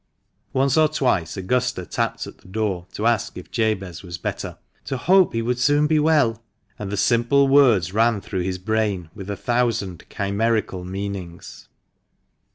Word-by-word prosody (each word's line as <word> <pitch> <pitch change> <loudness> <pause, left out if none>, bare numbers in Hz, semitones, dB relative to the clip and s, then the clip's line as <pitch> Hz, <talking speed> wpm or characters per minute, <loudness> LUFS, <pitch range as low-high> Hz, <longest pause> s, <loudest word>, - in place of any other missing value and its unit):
Once 135 +2 +2
or 155 - +6
twice 95 - 0
Augusta 125 0 -1
tapped - - -2
at - - -12
the - - -19
door, 95 -3 -2
to 105 - -4
ask 115 0 +1
if - - -10
Jabez 100 -7 -1
was 85 -2 -7
better, - - -5 0.2
and - - -42
to 135 - -2
"hope 185 +6 +4
he 115 0 -1
would 125 +1 -1
soon 145 +3 +3
be 155 0 +3
well," 145 -8 +2 0.4
and 100 -2 -5
the 105 - -2
simple 120 +6 +3
words 120 - +4
ran 115 0 +3
through 95 -1 -4
his 90 +1 -2
brain 100 -4 -1
with 100 -1 -9
a 100 - -3
thousand 115 -7 -1
chimerical 100 -2 -1
meanings. 95 -2 -7
110 Hz, 165 wpm, -22 LUFS, 95-125 Hz, 0.4 s, or